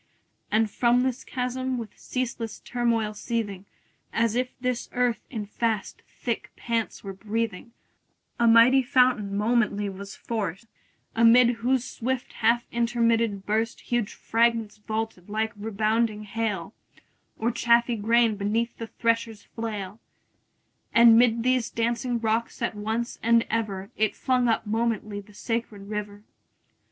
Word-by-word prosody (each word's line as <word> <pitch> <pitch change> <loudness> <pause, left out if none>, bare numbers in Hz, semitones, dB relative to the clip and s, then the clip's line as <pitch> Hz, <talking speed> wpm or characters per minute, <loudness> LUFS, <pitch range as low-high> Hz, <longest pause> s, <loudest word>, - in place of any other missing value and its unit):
And 220 +1 +3
from 245 +2 +3
this 260 -1 -2
chasm, 255 0 -2
with 225 -3 -7
ceaseless 235 -3 -4
turmoil 230 -3 0
seething, 205 -3 -3 0.5
As 230 -1 +1
if 250 +1 0
this 250 -1 -2
earth 245 -3 +1
in 220 -5 -4
fast 220 -1 -2
thick 235 -3 -4
pants 230 -2 -2
were 195 -1 -6
breathing, 220 +1 -3 0.7
A 235 - +4
mighty 230 +4 +7
fountain 250 -6 +2
momently 210 -2 +1
was 195 +1 -8
forced; 205 -3 -4 0.5
Amid 230 +2 +6
whose 250 +2 +1
swift 260 0 -3
half 235 +1 +2
intermitted 230 -3 +1
burst 220 +2 0
20 - - -19
Huge 240 -4 0
fragments 230 -2 +1
vaulted 215 -3 -4
like 220 +1 -1
rebounding 215 +1 0
hail, 210 -3 -3 0.6
Or 230 +2 0
chaffy 235 0 +3
grain 225 0 +3
beneath 220 +4 -1
the 230 - -5
thresher's 230 -2 -1
flail: 210 -3 -5 1.0
And 230 -1 +8
'mid 230 -1 +4
these 255 -2 +2
dancing 235 +1 -1
rocks 225 +1 -1
at 235 - 0
once 220 +3 -3
and 230 0 +4
ever 205 -4 -2
It 215 -1 +1
flung 250 -1 +1
up 225 -1 +1
momently 215 -2 -1
the 205 +1 -19
sacred 215 -3 -4
river. 205 -1 -5
230 Hz, 135 wpm, -26 LUFS, 210-235 Hz, 1.0 s, And